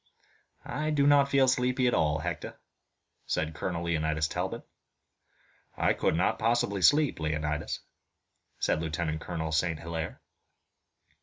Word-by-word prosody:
"I 150 +4 -2
do 145 -2 +2
not 140 -1 +5
feel 135 -1 +4
sleepy 125 0 +2
at 125 - +3
all, 75 -1 +2
Hector," - - -5 0.7
said 80 0 -1
Colonel 85 +1 -3
Leonidas 80 -2 0
Talbot. - - -3 1.1
"I - - +3
could - - +1
not 95 +6 +1
possibly 110 -3 +1
sleep, 145 - +4
Leonidas," 75 -1 -2 0.8
said 80 - 0
Lieutenant 80 -1 -2
Colonel 80 -3 -4
St. 80 0 0
Hilaire. 80 -1 -5
85 Hz, 125 wpm, -29 LUFS, 80-125 Hz, 1.1 s, not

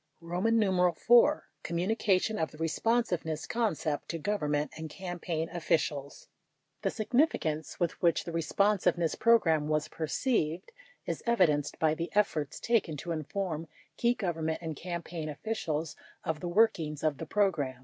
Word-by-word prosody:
84 180 0 +2
IY. 240 - +5 0.2
COMMUNICATION 190 +4 +1
OF 160 - 0
THE - - -14
RESPONSIVENESS 165 -2 0
CON 225 -7 0
CEPT 150 -1 -3
TO 165 - -2
GOVERNMENT 150 -6 -1
AND 160 0 -6
CAMPAIGN 175 -2 -4
OFFICIALS 150 -4 -1 0.5
The - - +1
significance 215 - 0
with 175 -2 -1
which 170 -2 +3
the 170 - -6
Responsiveness 175 0 +1
Program 165 -10 +3
was 155 0 0
perceived 165 - -1 0.3
is - - -3
evidenced 165 -11 +2
by 155 -1 +2
the 165 +2 -3
efforts 160 -9 +1
taken 205 -10 +1
to 170 +4 -5
inform 165 +1 -3 0.3
key 240 0 +2
Government 165 -6 -2
and 160 -2 -5
campaign 170 -1 -5
officials 160 -2 -3 0.3
of 160 -1 -2
the 175 - -4
workings 175 -7 +2
of 155 -3 +1
the 165 - -5
program. 160 -11 +1
170 Hz, 140 wpm, -30 LUFS, 155-205 Hz, 0.5 s, IY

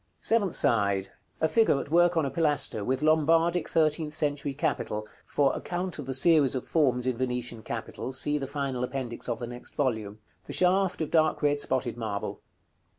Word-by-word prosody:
Seventh 210 -6 +1
side. 100 -3 +1 0.3
A 160 - +2
figure 220 -6 +3
at 140 - -7
work 175 +1 +4
on 160 - +2
a 135 - -3
pilaster, 150 -9 +2
with 130 +6 -1
Lombardic 165 +2 +3
thirteenth 155 -1 +1
century 145 -2 0
capital 105 -6 -2 0.2
(for 140 -2 +1
account 180 -1 -4
of 140 - -6
the 135 - -2
series 140 -1 +5
of 130 - -4
forms 130 -6 +1
in 130 -2 -1
Venetian 125 -2 -3
capitals, 120 +3 -5
see 150 +2 0
the 135 - -4
final 135 -3 -3
Appendix 125 -2 -5
of 120 - -1
the 120 - -5
next 120 +1 -10
volume), 110 -7 -1 0.3
the - - -7
shaft 185 0 +2
of 155 - -3
dark 155 -2 +2
red 145 0 +2
spotted 130 -4 -1
marble. 110 -3 -4
140 Hz, 180 wpm, -27 LUFS, 125-160 Hz, 0.3 s, series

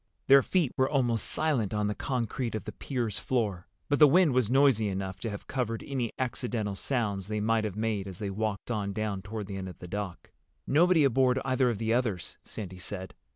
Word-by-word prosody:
Their 135 +1 +8
feet 170 -2 +1
were 130 0 +3
almost 120 -6 +1
silent 125 -10 +1
on 105 0 +1
the 105 - 0
concrete 120 -1 -2
of 110 - -3
the - - -6
pier's 120 -7 -2
floor, 105 -8 -1 0.2
but 145 - +1
the 150 - +9
wind 165 0 +5
was 125 -4 +2
noisy 130 -5 +4
enough 95 -1 -3
to 115 - -3
have 105 -1 -7
covered 120 -4 -2
any 130 -5 -2
accidental 120 -4 -2
sounds 100 -5 -1
they 105 0 -2
might 110 +1 +1
have 105 -3 -3
made 105 -2 -1
as 95 -3 -7
they 100 -2 -3
walked 105 +2 -3
on 100 -3 -2
down 105 -2 -2
toward 105 +2 -5
the 100 0 -6
end 95 -1 -5
of 90 - -11
the 90 - -9
dock. 95 -1 -5 0.3
"Nobody 165 +2 +4
aboard 130 -1 +3
either 130 -1 +2
of 115 - -1
the 110 +2 0
others," 115 -8 -1
Sandy 95 -4 -7
said. 95 0 -6
110 Hz, 210 wpm, -29 LUFS, 100-130 Hz, 0.3 s, the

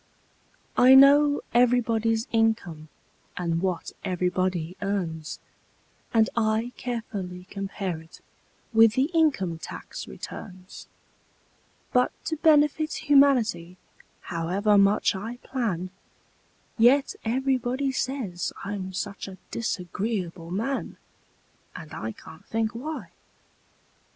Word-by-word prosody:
I 255 +1 +8
know 285 +2 +7
everybody's 230 -2 +2
income 220 -9 0 0.5
and 170 -2 -1
what 185 -2 -2
everybody 180 -1 -1
earns, 175 -6 -3 0.7
And 220 -1 +4
I 220 +1 +1
carefully 200 -7 -5
compare 195 -4 -4
it 160 +1 -16 0.5
with 225 -1 +6
the 275 +5 +1
income 230 - +2
tax - - -8
returns; 185 -1 -9 1.1
But 250 0 +3
to 320 0 -2
benefit 310 0 +3 0.2
humanity, 235 -11 +4 0.4
however 185 +5 0
much 200 +1 +4
I 225 +5 -5
plan, 185 -9 -2 0.9
Yet 265 +5 +5
everybody 260 +2 0
says 255 -9 -3
I'm 195 -2 -4
such 200 +1 -4
a 190 -1 -9
disagreeable 185 -4 -3
man! 230 +9 -3 0.8
And 155 -1 -9
I 110 0 -4
can't 160 - -14
think 220 -1 -1
why! 295 +7 -6
220 Hz, 95 wpm, -26 LUFS, 180-250 Hz, 1.1 s, I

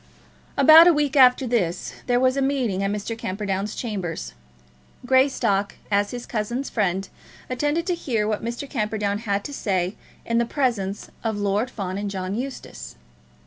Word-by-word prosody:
About 315 +4 +9
a 350 - +7
week 295 -2 0
after 260 -1 +6
this 195 -8 -1
there 245 -1 +3
was 255 0 +3
a 275 - 0
meeting 260 -8 0
at 195 - 0
Mr. 210 +2 -3
Camperdown's 200 -1 -3
chambers. 180 - -4 0.7
Greystock, 245 -6 +2 0.2
as 205 0 +2
his 245 -1 -6
cousin's 235 +4 -3
friend, 195 -2 0 0.4
attended 295 +6 0
to 360 - 0
hear 230 -11 -1
what 215 -1 -2
Mr. 235 +4 -4
Camperdown 210 -5 -1
had 200 -3 -1
to 285 - -6
say 190 -6 -1 0.3
in 230 0 +1
the 235 - +2
presence 230 -7 -2
of 220 -2 -1
Lord 205 +4 0
Fawn 195 -5 -4
and 205 0 -3
John 190 -1 -4
Eustace. 260 +4 -6
220 Hz, 160 wpm, -23 LUFS, 200-260 Hz, 0.7 s, About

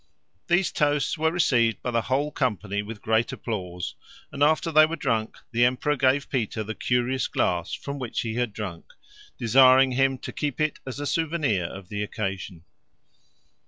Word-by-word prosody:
These 175 +2 +2
toasts 145 -2 +1
were 160 0 +1
received 120 - +2
by 125 - -1
the 115 -1 +1
whole 140 +5 -1
company 105 -7 -1
with 105 0 -9
great 110 +2 +1
applause, 90 -6 -5 0.4
and 140 - -7
after 155 +3 +3
they 155 0 +7
were 165 - -3
drunk 110 -8 -1
the 120 0 +2
emperor 130 +4 +2
gave 135 +1 +2
Peter 110 -4 -1
the 110 +1 -5
curious 125 +2 0
glass 85 -1 -1
from 140 0 -6
which 125 -3 -3
he 115 -2 -3
had 120 -1 -1
drunk, 100 -5 -7 0.5
desiring 130 +2 +6
him 135 +1 +2
to - - -7
keep 145 -4 -3
it 155 -1 0
as 130 +1 -5
a 145 - -3
souvenir 150 - 0
of 95 +2 -8
the 105 -1 -3
occasion. 95 -4 -4
125 Hz, 170 wpm, -25 LUFS, 110-145 Hz, 0.5 s, they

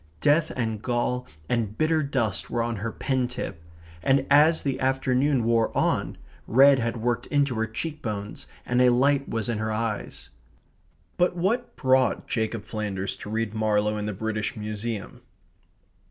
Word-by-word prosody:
Death 150 +2 +3
and 110 -4 -2
gall 125 +1 -1 0.2
and 110 -3 -1
bitter 155 0 +2
dust 130 -8 -1
were 120 -1 0
on 115 -1 -2
her 110 +3 -3
pen 130 +2 -1
tip; 110 -8 -6 0.4
and 135 +4 +2
as 155 +3 +5
the 135 -2 -1
afternoon 130 0 +1
wore 115 -1 +2
on, - - 0 0.3
red 135 +3 +6
had 115 0 -1
worked 120 +1 -1
into 145 -3 +1
her 110 -1 -1
cheek 155 +8 -5
bones 105 -3 -5 0.2
and 125 0 +2
a 125 - +6
light 135 +3 +2
was 115 -2 -2
in 115 -3 -1
her 110 0 -2
eyes. 110 -1 -4 0.9
But 175 0 +2
what 225 +8 -1
brought 130 -2 +2
Jacob 110 -2 -2
Flanders 100 -3 -3
to - - -8
read 110 0 -2
Marlowe 105 -1 +1
in 105 0 -3
the - - -1
British 110 +5 -3
Museum? 105 0 -5
120 Hz, 160 wpm, -26 LUFS, 110-135 Hz, 0.9 s, red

